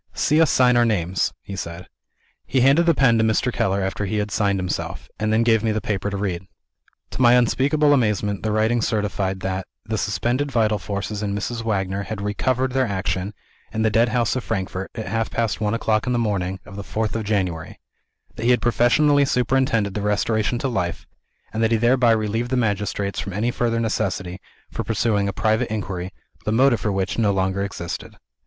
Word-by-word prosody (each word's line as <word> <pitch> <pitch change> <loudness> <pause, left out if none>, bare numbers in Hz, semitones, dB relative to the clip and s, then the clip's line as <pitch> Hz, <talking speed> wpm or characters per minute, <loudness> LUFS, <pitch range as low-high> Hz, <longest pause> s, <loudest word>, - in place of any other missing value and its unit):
"See 155 +2 +3
us 160 - +4
sign 125 -1 +4
our 120 - +5
names," 95 -6 0
he 100 - -7
said. 85 -1 -6 0.6
He 130 - +1
handed 140 +7 +4
the 165 - +5
pen 115 -5 +4
to - - +3
Mr. 110 +3 +1
Keller 95 0 0
after 95 +2 -2
he 105 - -1
had 105 0 -2
signed 100 -1 +1
himself 90 -1 -4
and 110 0 0
then 110 +1 +3
gave 115 -2 +3
me 110 - +1
the 110 - 0
paper 105 -2 -2
to 100 - -4
read. 95 -2 -3 0.6
To - - -4
my 120 -1 +7
unspeakable 145 +5 +3
amazement, 105 -5 +1
the 110 - -1
writing 110 +2 +2
certified 100 -4 -1
that, 95 0 -3 0.2
"the - - -2
suspended 130 +4 -1
vital 110 -4 +2
forces 100 +2 -4
in 100 -1 -2
Mrs. 115 +3 -3
Wagner 95 -3 -1
had 105 +1 -5
recovered 125 +6 0
their 130 -1 +1
action, 95 0 -2 0.4
in 110 - -1
the 110 - +2
Deadhouse 115 +2 +2
of 130 - -2
Frankfort, 95 -3 -3
at 110 -2 -4
half 115 -1 -1
past 115 -2 -1
one 105 +1 +1
o'clock 110 -1 0
on 125 - +1
the - - +1
morning 95 -5 -1
of 100 - -11
the 100 - -5
fourth 110 +2 -2
of 115 - -1
January; 95 -6 -2 0.6
that 115 - -4
he - - +3
had 125 - +5
professionally 140 +5 +3
superintended 125 -6 +1
the 105 - -3
restoration 110 +3 0
to 135 - -2
life; 90 -9 -2 0.5
and 110 - -1
that 115 - +3
he 115 - +4
thereby 120 +2 +3
relieved 110 +2 +1
the 130 - 0
magistrates 105 -3 -1
from 100 - -4
any 110 +5 0
further 115 -1 0
necessity 95 -5 -2 0.3
for - - -3
pursuing 105 -2 0
a - - 0
private 110 +4 0
inquiry, 95 -4 -4 0.3
the 105 - -1
motive 125 +1 +4
for 105 - -1
which 95 +2 -1
no 105 -3 +3
longer 95 0 0
existed." 85 -4 -6
110 Hz, 200 wpm, -22 LUFS, 100-120 Hz, 0.6 s, my